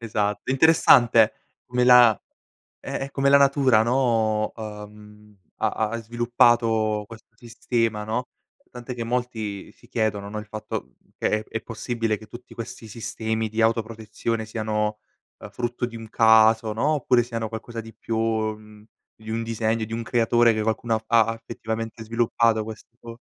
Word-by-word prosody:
Esatto. 105 -1 -2
Interessante 125 -6 +5 0.3
come 125 0 0
la 120 -4 +7 0.6
eh, - - -4
eh, 140 - -8
come 140 0 0
la 140 - +7
natura 135 -5 +4
no, 115 -3 +1
ehm, 105 -1 -11 0.2
ha - - 0 0.2
ha 115 - -3
sviluppato 115 -2 +2
questo 115 +1 -14
sistema, 115 -2 -2
no, 120 +4 -3 0.4
tant'è 125 +1 -8
che 120 -1 -4
molti 115 -4 -4
si - - -22
chiedono, 105 -2 -1
no, 110 - -5
il 105 - -8
fatto 110 0 -6 0.2
che - - 0
è 105 0 -1
è 110 - -6
possibile 115 -1 -2
che 110 +1 -14
tutti 120 +3 -12
questi 115 0 -8
sistemi 110 0 -3
di 110 +1 -3
autoprotezione, 110 0 -2
siano, 105 -1 -2 0.4
uhm, - - -10
frutto 120 0 -3
di 115 -1 -9
un 115 -1 -9
caso, 110 0 +4
no, 140 +8 +1
oppure 125 -4 +2
siano 115 -2 -4
qualcosa 115 +1 -7
di 115 0 -12
più 115 - -4
mhmm, 110 -1 -3 0.3
di 110 0 -10
un 115 +1 -2
disegno, 115 0 -1
di 110 - -10
un 115 +1 -3
creatore, 120 0 +3
che 110 - -1
qualcuno 110 +1 -1
ha - - +1
fa 115 0 +4
ha 115 - -2
effettivamente 115 0 -6
sviluppato 115 0 +1
questo 115 +1 -11
115 Hz, 160 wpm, -24 LUFS, 110-120 Hz, 0.6 s, la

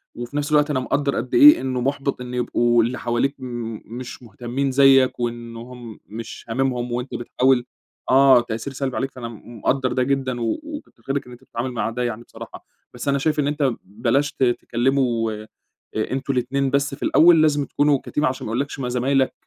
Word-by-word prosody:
وفي 120 +4 -6
نفس 145 0 -2
الوقت 150 0 +4
أنا 140 -3 +1
مقدّر 140 +2 0
قد 120 +3 -4
إيه، 295 +1 +8
إنّه 130 -1 -2
محبط 140 0 -2
إنّه 125 0 -5
يبقوا 120 -1 +2
اللي 125 +3 -2
حواليك 120 +4 0
م 120 -3 -5
مش 125 +2 -8
مهتمين 125 +3 -3
زيك 135 -1 +5
وإنّ 120 -1 -4
هم 120 -1 -10
مش 115 +2 -8
هاممهم، 125 0 -1
وأنت 125 +2 -3
بتحاول 125 +1 +1 0.4
آه 135 -1 +6
تأثير 115 +3 -5
سلبي 135 -1 -3
عليك، 135 0 -2
فأنا 125 -4 -7
م 115 +1 -11
مقدر 130 +4 0
ده 130 - +1
جدًا 130 -2 -1
و 115 - -1
وكتّر 300 -1 -10
خيرك 135 +1 -2
إن 125 - -13
أنت 120 +1 -13
بتتعامل 125 0 -4
مع 115 -2 -2
ده 125 +2 -3
يعني 120 -1 -3
بصراحة. - - -11 0.3
بس 125 +3 -7
أنا 140 0 +2
شايف 150 +2 0
إن 145 - +1
أنت 145 -3 +1
بلاش 120 +8 0
ت - - -2
تكلموا 120 -1 +1
أ - - -16 0.5
أنتم 130 +5 -2
الاتنين 135 +2 0
بس 140 +1 0
في - - -9
الأوّل، 165 -1 +6
لازم 145 -2 +2
تكونوا 145 -1 +2
كteam 150 - -1
عشان 130 0 -1
ما - - -4
يقولّكش: 140 +4 -2
"ما 125 -2 -2
زمايلك 130 +2 +1
130 Hz, 195 wpm, -22 LUFS, 120-140 Hz, 0.5 s, إيه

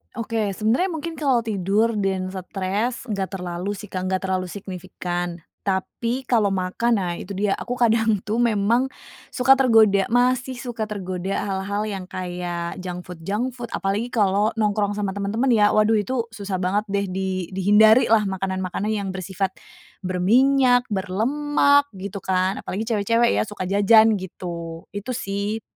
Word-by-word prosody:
Oke, 220 -2 -1
sebenernya 225 - +1
mungkin 325 +1 -5
kalau 275 -6 +2
tidur 215 +1 0
dan 190 -2 -1
stres 195 +6 -3
gak 200 -3 -2
terlalu 180 +1 -4
sih 205 +1 -7
Kak 185 0 -3
gak 185 - +1
terlalu 185 -1 0
signifikan. 175 -2 -5 0.2
Tapi 230 +6 -2
kalau 215 -5 +3
makan 195 +4 0
nah 175 -2 -2
itu 185 - -8
dia 200 +1 0
aku 245 +2 -5
kadang 225 -3 +3
tuh 215 +3 -3
memang, 235 +2 +2 0.4
suka 265 +1 +5
tergoda 220 -7 +5
masih 250 +1 +2
suka 240 -3 -4
tergoda 185 -2 -4 0.2
hal-hal 200 +2 -2
yang 195 -3 -4
kayak 175 -1 -4
junk 180 -1 -6
food 180 -2 -9
junk 220 +8 -2
food 240 -2 -7
apalagi 205 +5 -1
kalo 205 -2 +2
nongkrong 205 -1 +1
sama 195 -2 -1
temen-temen 205 +6 -1
ya 210 -2 +5
waduh 215 +1 +3
itu 230 +3 -1
susah 200 -3 -4
banget 195 +3 0
deh 200 0 0
di 185 -1 -2
dihindarilah 215 +3 +5
makanan-makanan 190 +2 -2
yang 205 -2 -2
bersifat, 190 0 -3 0.5
berminyak, 245 +8 +3
berlemak 285 +9 +2
gitu 200 +1 -6
kan 185 +1 0
apalagi 205 +4 -4
cewek-cewek 230 +2 +2
ya - - +1
suka 205 -2 -5
jajan 205 +2 +5
gitu 170 -3 -7
itu 205 +5 -5
sih. 205 0 -3
205 Hz, 150 wpm, -23 LUFS, 190-230 Hz, 0.5 s, suka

